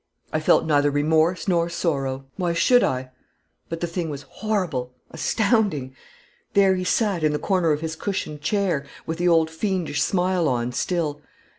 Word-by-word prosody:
I 155 - +2
felt 155 - +3
neither 145 -2 +3
remorse 160 +6 +1
nor 170 -2 +2
sorrow 135 -6 -2
why 175 -3 -1
should 245 +9 +4
I? 130 0 -1 0.6
but 165 0 -5
the - - +1
thing 170 -1 -3
was 145 -1 -6
horrible, 165 - -3 0.2
astounding. 200 - 0 0.6
There 195 -1 +5
he 185 -1 -2
sat 195 -2 +1
in 155 -1 +3
the - - +1
corner 180 -2 +1
of 150 0 0
his 160 -1 -3
cushioned 160 -5 -4
chair, 180 -3 0 0.2
with 160 +1 -4
the 175 - +2
old 165 -2 +3
fiendish 175 -3 -1
smile 180 -2 +1
on 120 -1 -1
still. 150 +1 -2
165 Hz, 165 wpm, -23 LUFS, 145-185 Hz, 0.6 s, There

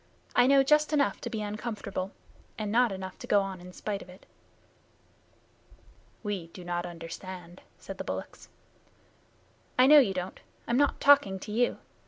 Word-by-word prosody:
I 245 0 +6
know 275 0 +6
just 300 +2 +3
enough 285 -2 +1
to - - -4
be 220 -3 -3
uncomfortable, 205 -3 -4 0.5
and 210 -2 -3
not 240 0 +4
enough 190 -1 -7
to - - -8
go 205 - +4
on 190 -2 -5
in 180 +1 -10
spite 200 +2 -4
of - - -12
it." 180 +1 -15 2.0
"We 200 -5 -3
do 180 +2 -11
not 175 0 -2
understand," 175 +1 -9 0.2
said - - -9
the - - -2
bullocks. - - -6 1.3
"I 255 - +7
know 295 +2 +9
you 200 -9 +2
don't. 180 0 -4 0.3
I'm 240 - +1
not 285 0 +2
talking 275 -9 +5
to 210 - -7
you. 240 +3 +1
205 Hz, 165 wpm, -29 LUFS, 185-245 Hz, 2.0 s, know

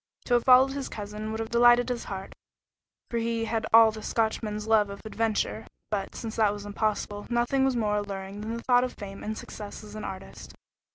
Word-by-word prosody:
To 245 - 0
have 240 -1 +3
followed 260 +1 +7
his 275 -1 -4
cousin 210 +1 -6
would 220 0 -4
have 225 0 -4
delighted 240 +1 +5
his 245 -1 -3
heart, 195 -1 -6 0.8
for 235 - 0
he 230 0 -1
had 225 0 -1
all 225 0 +8
the 215 0 -8
Scotchman's 215 -1 -1
love 220 -2 +3
of 200 - -7
adventure, 220 0 -1 0.2
but, 195 -2 -2
since 225 -1 -6
that 215 -2 +4
was 205 0 -7
impossible, 205 0 -2
nothing 240 +3 +2
was 265 -2 +1
more 210 -3 +1
alluring 200 0 -5
than 220 +2 -4
the 235 - -8
thought 245 -1 +4
of 255 - -3
fame 195 -1 -9
and 215 +1 -4
success 210 0 -8
as 210 -1 -11
an 215 0 -6
artist. 190 0 -8
220 Hz, 210 wpm, -27 LUFS, 210-235 Hz, 0.8 s, all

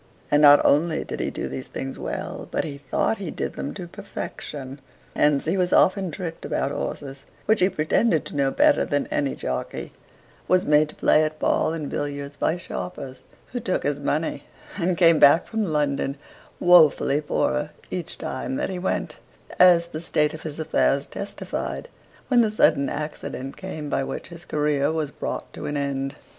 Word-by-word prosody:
And 145 0 +5
not 145 -1 +8
only 155 +2 +3
did - - -6
he - - -1
do - - -4
these 130 - -6
things 135 0 -6
well, - - -5
but - - -1
he 140 -3 -6
thought 170 +9 -1
he 190 -5 -4
did - - -4
them - - -4
to 185 - -6
perfection; 135 -5 -7 0.3
hence 145 -2 +3
he 170 +5 0
was 180 -1 +1
often 190 -1 +4
tricked 165 0 -6
about - - -1
horses, 135 -1 -5 0.2
which 220 0 +3
he 185 - +4
pretended 165 +2 +1
to - - -6
know 140 -1 +2
better 295 - +4
than 145 0 0
any 140 -2 0
jockey; 65 0 -4 0.5
was 185 +1 +3
made 150 0 +4
to - - -11
play 155 - +4
at 155 0 -2
ball 155 - +1
and 160 -3 -4
billiards 145 0 -4
by 160 - 0
sharpers 130 - -7 0.3
who 245 - -3
took 185 -5 -1
his 145 0 -1
money, 150 +3 -2 0.3
and 180 -2 0
came 165 -3 +6
back 145 +4 +6
from 220 -1 -2
London 145 -3 0 0.4
wofully 155 -4 +5
poorer 150 0 0 0.2
each 180 -3 -4
time 130 0 -4
than - - -2
he 185 - -4
went, 185 - -2 0.4
as 175 -2 +6
the 155 -1 -6
state 150 -3 +1
of 155 - -8
his 155 -1 -6
affairs 140 -2 +1
testified 200 - -5 0.4
when 245 -3 +5
the 220 - +3
sudden 140 -9 +3
accident 145 -3 -5
came 160 -6 -6
by 135 - 0
which 135 - -6
his 170 0 -11
career 150 -1 +1
was 155 -3 -2
brought - - -5
to - - -6
an 145 - -2
end. 135 0 -2
150 Hz, 180 wpm, -24 LUFS, 140-175 Hz, 0.5 s, not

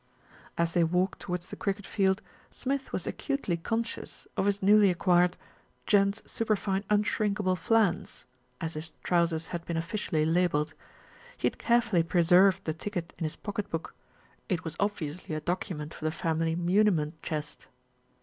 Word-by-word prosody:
As 170 0 +1
they 175 - +4
walked 180 +3 +1
towards 180 -1 -4
the - - -5
cricket 200 0 -2
field, 190 -1 +1 0.3
Smith 270 +1 -3
was - - -2
acutely 275 - -1
conscious 225 +7 -4
of 195 - +1
his 200 0 0
newly 205 0 +6
acquired 180 0 +3 0.5
"Gents' 200 0 +3
Super 220 -1 0
fine 195 -1 -1
Unshrinkable 210 -2 +1
Flans," 200 -2 +1 0.3
as 165 -2 -3
his 155 +1 -5
trousers 170 -2 +1
had 170 -1 -3
been 170 - -2
officially 165 -2 -1
labelled. 160 -2 +1 0.6
He - - -2
had - - 0
carefully 235 -6 +3
preserved 180 +3 +4
the 155 - 0
ticket 175 0 -5
in 165 - -1
his 155 - -3
pocket 205 -1 -4
book; 165 -1 -4 0.6
it 175 -5 0
was 160 -1 -5
obviously 180 -6 -2
a - - -1
document 165 -2 -3
for - - -11
the 155 - +1
family 165 0 0
muniment 175 -3 +2
chest. 150 -2 -5
180 Hz, 155 wpm, -29 LUFS, 165-205 Hz, 0.6 s, newly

